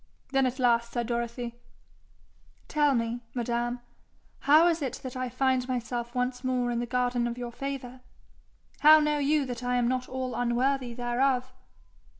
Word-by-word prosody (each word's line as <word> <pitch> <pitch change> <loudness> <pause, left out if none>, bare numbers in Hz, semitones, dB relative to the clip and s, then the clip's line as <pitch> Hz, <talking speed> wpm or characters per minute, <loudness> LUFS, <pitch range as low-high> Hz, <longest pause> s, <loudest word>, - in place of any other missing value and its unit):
Then 270 -1 +3
at 255 +1 -3
last 235 -2 +2
said 240 -1 -1
Dorothy: 235 0 -4 1.1
'Tell 295 -3 +2
me, 230 +1 -1
madam, 240 0 -1 0.6
how 305 +4 +6
is 335 -2 +2
it 265 -3 -2
that 255 -1 -6
I 255 -1 -2
find 255 0 +1
myself 240 -1 -3
once 250 +1 -1
more 250 -1 0
in 235 - -1
the 240 - -3
garden 245 -1 0
of 235 0 -4
your 245 -1 -5
favour? 260 -1 -6 0.8
How 310 +1 +8
know 300 -1 +1
you 290 0 +2
that 245 -2 -5
I 250 0 0
am 245 -1 +2
not 255 0 -1
all 260 -1 -3
unworthy 245 +1 0
thereof?' 250 +1 0
250 Hz, 160 wpm, -28 LUFS, 240-265 Hz, 1.1 s, How